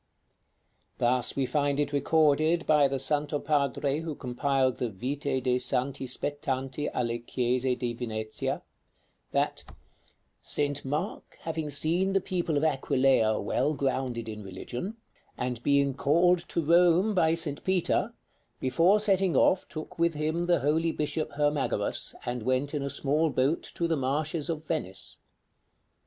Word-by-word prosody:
Thus 120 0 +2
we 135 - +1
find 145 +1 0
it 145 0 0
recorded 155 +3 +3
by 150 -2 +5
the 135 0 -2
Santo 145 +2 0
Padre 145 -1 0
who 160 -2 -4
compiled 130 0 0
the 120 - -1
"Vite 130 +5 -2
de' 125 -1 +2
Santi 130 +1 -1
spettanti 135 +1 -3
alle 120 -1 -1
Chiese 125 +1 0
di 120 -2 -2
Venezia," 110 -2 -3 0.7
that - - 0 0.8
"St. 145 -1 -1
Mark 145 +3 -4
having 160 -2 -3
seen 170 +7 0
the 195 - +4
people 175 -5 -1
of 145 - 0
Aquileia 130 -6 +2
well 150 +4 0
grounded 130 -4 -2
in 105 -1 -6
religion, 120 - -6 0.4
and 125 -2 -3
being 140 0 +3
called 170 +6 +3
to 170 - -1
Rome 175 +5 +4
by 165 -4 +3
St. 150 -4 -3
Peter, 185 -2 +1 0.4
before 165 +11 +3
setting 195 -4 +2
off 185 - +3
took 155 +1 -8
with 170 -1 +2
him 160 +3 -1
the 175 - +3
holy 160 +3 +2
bishop 155 0 -2
Hermagoras, 145 0 -1
and 120 0 -3
went 130 +5 0
in 145 - -1
a 140 - -2
small 150 +4 +1
boat 140 +3 +1
to 170 - 0
the 165 - +1
marshes 150 +4 -1
of 160 -1 -3
Venice. 95 - -4
145 Hz, 145 wpm, -28 LUFS, 130-160 Hz, 0.8 s, by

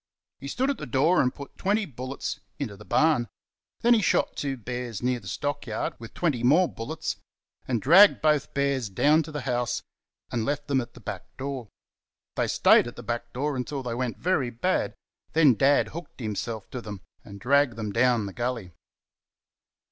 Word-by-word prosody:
He 140 - -7
stood 260 - 0
at 280 - -5
the 150 - -6
door 145 +9 +3
and 125 - +2
put 140 +1 -11
twenty 205 +2 +1
bullets 130 -1 -5 0.2
into 120 -8 -4
the 105 - -13
barn; 150 -2 +2 0.5
then 240 +1 +5
he 225 - +4
shot - - +1
two 135 -2 -2
bears 120 -1 -5
near 125 0 +1
the 100 - -13
stock 145 +9 -3
yard 110 - -2
with 115 -1 -11
twenty 150 -9 0
more 155 +9 +5
bullets, 155 +7 -5 0.5
and 120 -3 0
dragged 180 - +7
both 150 -2 +2
bears 140 -5 0
down 150 +11 +4
to 155 - -7
the 150 -1 -4
house 120 -1 -1 0.5
and 115 -2 -1
left 145 +4 -2
them 135 -2 +2
at 120 - -10
the - - -11
back - - -6
door. 135 -4 -4 0.7
They - - +1
stayed - - +5
at 120 - -8
the 120 - -9
back 120 +1 -4
door 145 +3 -2
until 135 +2 -3
they 120 -2 -3
went 125 0 -2
very 170 -8 +1
bad; 120 -1 -1 0.4
then 155 -5 +6
Dad 135 +6 +3
hooked 170 -2 -9
himself 110 -1 -4
to 125 - -5
them 105 -4 -8 0.2
and 100 -1 -11
dragged 140 +2 +3
them 110 -2 -4
down 120 -1 +3
the 100 - -6
gully. 120 -6 -3
130 Hz, 190 wpm, -26 LUFS, 120-145 Hz, 0.7 s, dragged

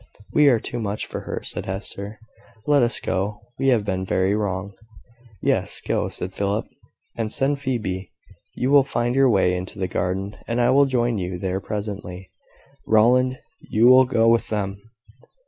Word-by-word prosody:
"We 150 -1 +5
are 120 -4 +3
too 120 - -5
much 105 -1 -3
for - - -6
her," - - -4
said - - -5
Hester; 100 +2 -6 0.5
"let 145 -1 +4
us 120 0 +3
go, 100 +3 -2 0.2
we 135 - +1
have 120 -6 +3
been 95 -2 -1
very 95 +1 +1
wrong." 100 -1 -2 0.7
"Yes, - - 0
go," - - -1
said 95 +1 -5
Philip, 100 +2 -1 0.5
"and 110 -2 -3
send 140 +3 +1
Phoebe. 105 -9 -3 0.4
You 130 +2 0
will 145 -1 +8
find 120 -2 -1
your 135 0 +4
way 95 -4 +3
into 90 +1 -6
the 95 -1 -1
garden, 95 +3 -2
and 115 +1 -1
I 120 +1 +4
will 140 +2 +5
join 120 -4 0
you 90 0 -3
there 95 +1 -2
presently. 100 -3 -6 0.6
Rowland, 125 +4 +4 0.2
you 110 +2 +1
will 130 +1 +8
go 115 -3 +2
with 115 0 +3
them." 100 -2 -3
105 Hz, 170 wpm, -23 LUFS, 95-125 Hz, 0.7 s, will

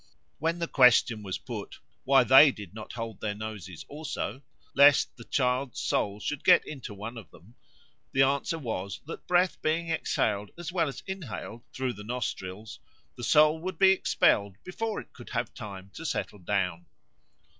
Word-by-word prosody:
When 165 +2 0
the 170 -1 -2
question 125 -5 +5
was 95 -3 -4
put, - - -7 0.3
Why 135 0 +6
they 135 +3 +8
did 105 -6 -10
not 110 0 -9
hold 115 -3 -6
their 105 -1 -2
noses 105 -5 -7
also, 145 -2 -5 0.3
lest 140 +1 +5
the 115 - -12
child's 125 -1 0
soul 100 0 -1
should 150 +5 -4
get 180 -2 +6
into 135 -7 -7
one 110 +4 -7
of 90 -7 -14
them? 95 +8 -18 0.6
the 135 - +4
answer 140 +4 0
was 100 - -4
that 165 - -9
breath 180 0 +2
being 165 +2 0
exhaled 105 -9 0
as 175 0 -6
well 170 -3 +1
as 140 - -7
inhaled 145 - -6
through 130 -1 -2
the 105 - -10
nostrils, 105 -3 -5 0.4
the 120 - -9
soul 155 +4 +5
would 185 +3 -5
be 190 -1 +6
expelled 100 - +2
before 220 +4 -3
it - - -12
could - - -12
have - - -3
time 100 -2 -9
to 165 - -8
settle 145 -8 -3
down. 90 -2 -2
125 Hz, 170 wpm, -28 LUFS, 105-155 Hz, 0.6 s, they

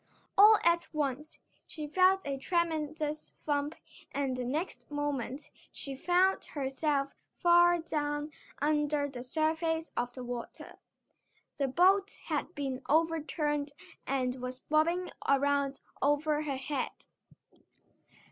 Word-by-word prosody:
All 420 +2 +9
at 340 0 +3
once 300 0 -2 0.3
she 305 -2 -5
felt 370 +5 +3
a 280 -1 -1
tremendous 310 -2 -2
thump 290 +1 0 0.4
and 275 -2 -1
the 255 - -3
next 300 +9 -3
moment 290 -2 -3 0.2
she 275 -1 -6
found 360 +6 +2
herself 275 0 -1 0.2
far 345 0 +5
down 295 -2 -2 0.3
under 295 0 +1
the 255 -3 -7
surface 320 +4 -1
of 245 0 -1
the 255 - -7
water. 245 -1 -7 0.8
The 275 - +1
boat 380 +8 +3
had 310 +2 -3
been 270 -3 -3
overturned 300 -2 +1 0.3
and 255 -2 -1
was 255 0 -4
bobbing 335 +4 +1 0.2
around 280 0 +2 0.2
over 295 +1 +2
her 285 -3 -2
head. 270 0 -4
295 Hz, 115 wpm, -31 LUFS, 275-325 Hz, 0.8 s, All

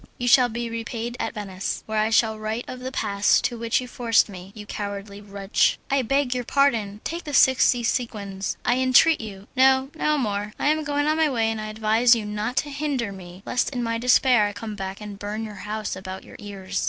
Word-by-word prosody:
You 245 -3 -3
shall 245 0 +6
be 235 +1 -4
repaid 230 +1 -4
at - - -3
Venice, 195 -3 -4
where 220 0 -1
I 215 +1 +2
shall 220 -1 +2
write 220 +2 -3
of 255 - -7
the 255 +1 -5
pass 200 -6 +2
to 240 - -1
which 230 0 0
you 250 - -6
forced 235 -3 +2
me, 185 -1 -10
you 210 -1 -9
cowardly 200 0 -6
wretch!" 200 -1 +1
"I 275 0 +3
beg 270 +1 +1
your 250 -1 -2
pardon! 225 -7 +1
take 340 +1 -4
the 295 -2 -4
sixty 255 -2 +4
sequins, 200 -5 -2
I 245 - +3
entreat 260 +5 +5
you." 205 -2 -9
"No, 265 +1 +4
no 305 -1 +1
more. 210 -4 -2
I - - +1
am 310 0 +1
going 290 -1 0
on 310 +1 +1
my 320 -1 +3
way, 225 -4 +1
and 220 -1 -4
I 215 - -5
advise 220 +3 +3
you 220 -2 -3
not 210 +4 -3
to 290 - 0
hinder 275 -7 -2
me, 185 -1 -11
lest 250 - 0
in 250 -3 -3
my 230 0 -1
despair 250 -2 +4
I 205 - -5
come 215 +1 -6
back 195 0 -6
and 205 -1 -8
burn 210 +2 -4
your 210 -2 -8
house 215 -2 -3
about 190 0 -7
your - - -14
ears." 195 -2 -5
225 Hz, 225 wpm, -24 LUFS, 205-255 Hz, -, shall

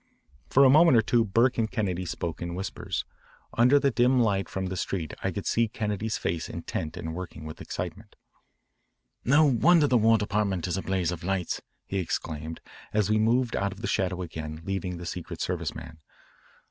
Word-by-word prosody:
For 140 - +5
a - - +7
moment 155 -2 +7
or 110 - +4
two 115 +1 +3
Burke 115 +4 +2
and 110 -1 +1
Kennedy 95 -7 -2
spoke 85 -2 -4
in 85 0 -4
whispers. 95 +2 -4 0.5
Under 125 +5 +5
the 140 -1 +2
dim 125 +3 +3
light 100 -5 +1
from 95 0 -3
the 95 0 -3
street 90 -4 -3
I - - +1
could - - -5
see 115 0 +2
Kennedy's 105 0 -2
face 80 -1 -2
intent 75 -1 -5
and 80 0 -5
working 85 -2 -7
with 80 - -8
excitement. - - -6 1.1
"No 150 +5 +5
wonder 150 +5 +5
the 125 -4 +3
War 115 +1 +5
Department 100 -4 -1
is 90 - -1
a 95 - -2
blaze 95 -3 0
of 85 -1 -6
lights," 95 -1 -1 0.2
he 100 - -2
exclaimed 80 -2 -4 0.3
as 105 -1 +1
we 110 - +3
moved 120 +2 +2
out 100 0 0
of 100 - -13
the 120 - -2
shadow 90 -2 0
again, 80 -1 -7
leaving 95 -2 -3
the 85 - -8
Secret 85 0 -6
Service - - -2
man. 80 - -9
100 Hz, 190 wpm, -27 LUFS, 90-115 Hz, 1.1 s, a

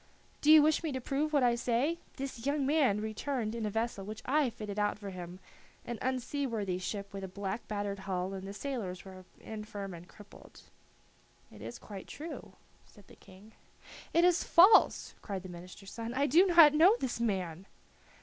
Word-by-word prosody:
"Do 300 - +5
you 310 -1 +9
wish 310 0 +3
me 320 -3 -2
to 260 - -2
prove 280 +4 -1
what 285 -4 +3
I 240 -1 +4
say? 250 +7 0 0.2
This 265 -4 -6
young 285 -1 +1
man 275 -8 +2
returned 220 +1 -3
in 230 -2 -3
a - - -1
vessel 225 -1 -2
which 215 +2 -8
I 285 0 +2
fitted 210 -2 -6
out 205 0 0
for 200 -2 -7
him, 180 0 -8 0.5
an 240 -2 -5
unseaworthy 250 -7 -2
ship 200 +2 -5
with 195 0 -6
a - - -4
black 195 +3 -5
battered 205 -1 -3
hull, 190 0 -3
and 195 0 -6
the - - -6
sailors 200 -6 -5
were 185 -1 -11
infirm 210 -3 -7
and 170 +1 -11
crippled." 205 0 -15 0.9
"It 105 - -14
is 115 +2 -7
quite 200 -3 -10
true," 315 +3 -8 0.3
said 205 -3 -19
the - - -15
King. 195 +4 -17 0.6
"It 335 - +3
is 355 -1 +3
false," 370 +6 +5
cried 195 -3 -5
the 185 - -9
minister's 180 +3 -11
son. 230 0 -5
"I 280 +2 +2
do 335 +8 +5
not 335 -4 +8
know 340 +8 +6
this 250 -3 -3
man!" 190 -5 -2
220 Hz, 190 wpm, -31 LUFS, 195-275 Hz, 0.9 s, you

